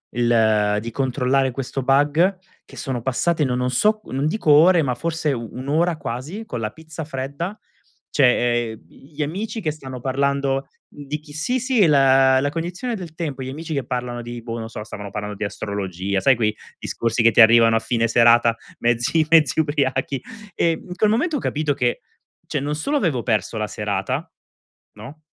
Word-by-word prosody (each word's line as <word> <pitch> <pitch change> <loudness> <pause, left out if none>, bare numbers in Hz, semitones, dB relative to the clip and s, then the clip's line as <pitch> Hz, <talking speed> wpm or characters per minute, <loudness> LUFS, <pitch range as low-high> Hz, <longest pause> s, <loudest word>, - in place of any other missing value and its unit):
il 110 -3 +3
di 115 +1 -6
controllare 130 0 +1
questo 135 +1 -4
bug 145 +8 +3 0.3
che - - -15
sono 130 -4 -3
passate, 150 +6 0
no 125 -2 0
non 125 0 0
so, 215 - +2
non 135 +3 -2
dico 160 -2 -1
ore, 165 +3 +6
ma 125 -4 -1
forse 160 0 -1
1 125 +2 -6
ora, 165 +2 +1
quasi, 145 - -6
con 125 - -5
la 110 -1 -2
pizza 160 0 -9
fredda; 140 +8 -5 0.5
cioè, 120 -3 +2
ehm, 110 - -15
gli 150 +2 -11
amici 205 +9 -4
che 155 -5 -1
stanno 135 -4 -8
parlando 140 0 0 0.2
di 145 +1 -6
chi 150 -1 -15
sì, 245 - -1
sì, 245 -6 +3
la, 135 -2 +5
la 145 +2 0
cognizione 175 - -4
del 175 -5 -8
tempo, 145 -6 -4
gli 130 - -5
amici 155 +3 -6
che 140 - -1
parlano 125 -1 -3
di 120 0 -7
boh, 115 0 -6
non 115 - -4
lo - - -6
so, 105 - -7
stavano 105 -2 -8
parlando 105 0 -5
di - - -4
astrologia, 100 -2 -3
sai 130 +6 +5
quei 110 -2 0 0.2
discorsi 115 +1 -1
che 115 - +6
ti 120 - +6
arrivano 115 0 +6
a - - +3
fine 115 0 0
serata, 115 0 +5 0.2
mezzi 120 +7 +1
mezzi 160 -3 +4
ubriachi. 135 -3 0 0.3
E 170 - +2
in 180 +2 -6
quel 210 +2 +2
momento 295 +9 +1
ho - - -3
capito 150 - -1
che, 120 -2 0 0.5
cioè 145 - -2
non 145 +2 -2
solo 280 - -2
avevo 155 - 0
perso 110 -1 -1
la 105 - -1
serata, - - -3 0.6
no, 120 +9 -11
135 Hz, 185 wpm, -22 LUFS, 120-155 Hz, 0.6 s, ore